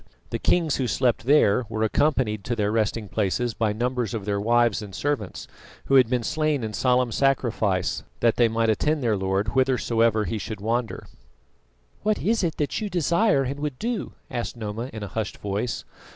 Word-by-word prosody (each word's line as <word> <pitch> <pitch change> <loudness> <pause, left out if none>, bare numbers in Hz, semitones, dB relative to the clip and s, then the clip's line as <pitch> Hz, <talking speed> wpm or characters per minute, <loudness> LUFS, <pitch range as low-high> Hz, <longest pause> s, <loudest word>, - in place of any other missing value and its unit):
The - - -2
kings 165 -4 +2
who 130 - 0
slept 120 -1 0
there 125 -5 +4
were 110 -1 -1
accompanied 110 -3 +1
to 120 - -1
their 105 -2 0
resting 110 -1 0
places 110 +4 -1
by 110 -1 0
numbers 120 0 -1
of 105 -3 -4
their 100 -1 0
wives 115 -2 +2
and 100 -3 -8
servants, 140 -10 -3 0.4
who - - -1
had 130 -4 +6
been 125 -2 0
slain 155 0 0
in 110 -1 -4
solemn 125 +1 +2
sacrifice 115 -9 +1 0.2
that 115 -2 +3
they 120 - +4
might 115 0 +1
attend 150 +6 0
their 115 -3 +2
Lord 95 +1 0
whithersoever 115 -3 +2
he 110 - -3
should 110 +2 -6
wander. 115 +2 -2 1.0
"What 215 0 +1
is 225 +1 +1
that 160 0 -1
you 210 - -2
desire 175 -2 +2
and 135 +2 -4
would 145 -3 -3
do?" 235 - -3 0.2
asked 120 -1 -4
Noma, 110 +3 -4
in 110 -1 -7
a - - -4
hushed 110 -2 -3
voice. 105 +4 -3
115 Hz, 180 wpm, -25 LUFS, 110-135 Hz, 1.0 s, had